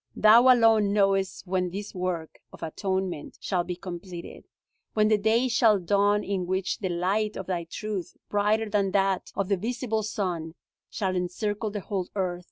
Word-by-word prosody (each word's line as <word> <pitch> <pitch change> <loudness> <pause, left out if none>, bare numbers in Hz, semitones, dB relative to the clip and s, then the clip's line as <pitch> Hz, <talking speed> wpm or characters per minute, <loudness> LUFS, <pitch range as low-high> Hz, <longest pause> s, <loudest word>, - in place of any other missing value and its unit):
Thou 235 +4 +7
alone 225 -4 +4
knowest 195 -2 +1
when 180 -1 0
this 200 +3 -6
work 180 -4 -3
of - - -11
atonement 190 -1 -3
shall 180 -3 -1
be 180 0 -4
completed; 175 -1 -8 0.5
when 215 0 +4
the 215 - +4
day 225 +4 +2
shall 230 -3 +4
dawn 205 +3 +2
in 190 -3 -2
which 185 +1 -1
the 190 - -2
light 195 +5 0
of 190 - -5
Thy 175 -2 -2
truth, 195 +1 -5
brighter 210 +2 +1
than 200 -2 0
that 195 -1 +1
of 195 - -1
the 200 -1 +1
visible 225 +2 -2
sun, 180 -6 -3 0.3
shall 190 -3 -2
encircle 205 +4 -2
the 205 0 -5
whole 190 -2 -3
earth. 180 -3 -1
195 Hz, 170 wpm, -27 LUFS, 180-210 Hz, 0.5 s, Thou